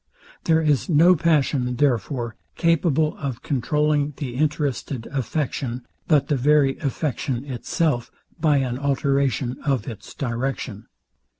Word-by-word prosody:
There 160 -1 +4
is 150 0 +1
no 170 +3 +6
passion, 145 -6 +1
therefore, 120 -3 0 0.2
capable 160 -2 +2
of 130 -4 -5
controlling 150 +2 +1
the 130 -5 -4
interested 145 -3 -1
affection, 130 -2 -2 0.2
but 145 -4 +3
the 145 - +1
very 140 0 +3
affection 135 -2 -2
itself, 135 0 -1 0.3
by 150 -2 +3
an 130 -2 -1
alteration 135 -2 0
of 135 -6 0
its 110 -4 -8
direction. 120 -4 -3
140 Hz, 115 wpm, -23 LUFS, 125-150 Hz, 0.3 s, no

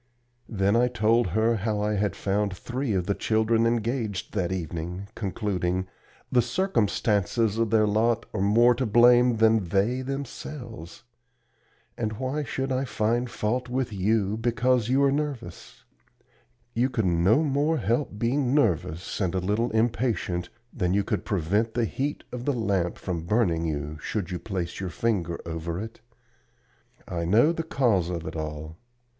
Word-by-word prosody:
Then 100 -1 +1
I 120 +1 +4
told 115 -1 +2
her 110 +6 +2
how 105 0 -1
I 105 +1 0
had 105 0 0
found 100 -1 -1
three 125 +3 -3
of 90 -2 0
the 100 - +1
children 110 +2 +2
engaged 115 -3 -2
that 95 -4 -1
evening, 90 +2 -4
concluding: 95 -3 -2 0.5
"The 125 - +5
circumstances 115 - +1
of 115 -1 +1
their 110 0 +4
lot 110 +2 +1
are - - -1
more 115 +5 +5
to 125 +1 -2
blame 120 +2 +5
than 110 -2 +4
they 105 +7 +1
themselves. 125 - -7 1.0
And 110 -2 -1
why 130 +6 -2
should 135 -1 -3
I 130 +1 +1
find 120 0 0
fault 120 +3 -2
with 125 -3 -2
you 100 +1 +1
because 120 +1 +1
you 135 +2 +3
are 140 - +4
nervous? 140 - -4 0.9
You 125 +3 +1
could 115 -5 -1
no 90 - +3
more 150 +2 +1
help 115 0 -1
being 125 +4 +1
nervous 90 - 0
and 95 -2 0
a - - +2
little 105 +6 0
impatient 110 -6 0 0.2
than 90 0 0
you 100 - +2
could 100 -2 -2
prevent 105 +3 0
the 120 -1 +2
heat 140 +6 -3
of 125 0 -6
the 145 - +1
lamp 100 -7 0
from 85 -3 -4
burning 85 -7 +1
you, 75 0 -4
should 100 -2 -3
you 90 - -3
place 90 -5 -4
your 95 -1 -3
finger 85 -5 -1
over 85 +1 -4
it. 115 +2 -8 1.1
I 85 -2 -3
know 110 - +4
the 165 - -2
cause 120 - +1
of 85 -2 -4
it 80 - -6
all. 80 0 -5
110 Hz, 160 wpm, -26 LUFS, 95-120 Hz, 1.1 s, The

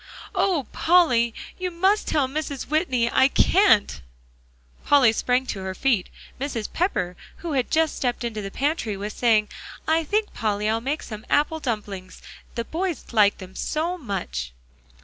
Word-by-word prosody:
"Oh, 345 -9 +1
Polly! 310 -10 +4 0.3
you 365 0 -1
must 380 +5 +1
tell 285 -4 +2
Mrs. 280 -1 -4
Whitney 260 -6 +1
I 265 - +5
can't." 280 - +3 0.8
Polly 270 -6 +5
sprang 250 +3 +1
to 205 - -4
her 190 0 -4
feet; 230 -5 +1 0.3
Mrs. 255 -6 -4
Pepper, 180 - 0 0.3
who 335 - -2
had 260 -4 0
just 320 -1 +1
stepped 245 -1 -1
into 225 -3 -3
the 195 - -5
pantry, 265 - -1
was 205 +1 -5
saying, 220 -3 +2 0.4
"I 320 +1 +3
think, 420 +7 -1
Polly, 210 -2 -1
I'll 225 +1 +1
make 280 +5 -2
some 215 -1 -8
apple 300 +2 +2
dumplings, 205 -8 -5 0.4
the 235 0 -2
boys 345 +2 -3
like 210 -3 +4
them 185 -1 -11
so 330 +3 -1
much." 60 - -4
255 Hz, 155 wpm, -24 LUFS, 210-315 Hz, 0.8 s, I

